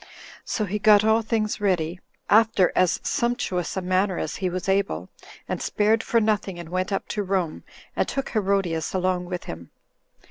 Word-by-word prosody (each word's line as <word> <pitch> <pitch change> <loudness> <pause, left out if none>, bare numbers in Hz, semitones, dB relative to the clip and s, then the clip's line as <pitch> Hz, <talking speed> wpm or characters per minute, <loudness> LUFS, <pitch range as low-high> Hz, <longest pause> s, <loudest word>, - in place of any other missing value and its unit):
So 215 - -2
he 210 +2 -3
got 210 0 +6
all 220 +1 +4
things 215 -1 -1
ready, 180 -3 0 0.3
after 215 -4 +4
as 185 -1 +3
sumptuous 195 -8 -1
a 190 - -2
manner 185 +1 +1
as - - -3
he 185 -1 -1
was 180 +1 -4
able, 190 - 0 0.4
and - - -3
spared 215 +2 +2
for 230 - +2
nothing, 210 -4 0
and 170 -2 -8
went 185 +2 -2
up 195 - -2
to 210 - -1
Rome, 185 -4 -2 0.3
and - - +1
took 275 -1 -3
Herodias 195 -6 0
along 185 -1 0
with 180 0 -5
him. 85 0 -8
190 Hz, 175 wpm, -24 LUFS, 180-215 Hz, 0.4 s, got